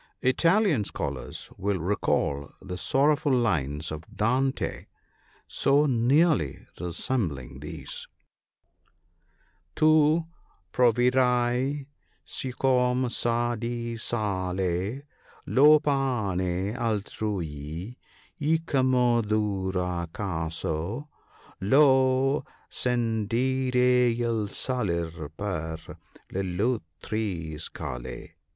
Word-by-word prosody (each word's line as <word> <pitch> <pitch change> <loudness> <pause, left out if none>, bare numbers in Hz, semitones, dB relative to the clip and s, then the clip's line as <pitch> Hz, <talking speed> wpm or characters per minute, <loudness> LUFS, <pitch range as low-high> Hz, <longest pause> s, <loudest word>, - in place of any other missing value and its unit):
— - - -50
Italian 165 - +3
scholars - - -5
will 100 0 0
recall 75 -6 0
the 90 -1 -6
sorrowful 145 - +2
lines 80 - 0
of 80 +1 -5
Dante, 130 +5 0 0.6
so 140 +2 +3
nearly 130 - +2
resembling 85 - -3
these - - -5 0.5
— - - -44
" 85 +2 -40
Tu 155 +1 +4 0.5
proverai 125 +2 +2 0.4
siccome 125 -1 +1
sa 120 0 +1
di 120 0 -3
sale 95 0 -1 0.4
Lo 150 +3 +6
pane 105 - 0
altrui, 100 - -3 0.4
e 155 +2 +3
com 130 -4 +2
'e 120 -1 +4
duro 95 -5 -1
Caso 85 - -3 0.5
Lo 130 +3 +4 0.3
scendere 125 +2 +2
e 115 - -1
1' 110 -3 0
salir 85 - -2
per 80 -6 -3 0.5
l'altrui 95 -3 -2
scale." 60 -5 -6
115 Hz, 80 wpm, -27 LUFS, 90-130 Hz, 0.6 s, Lo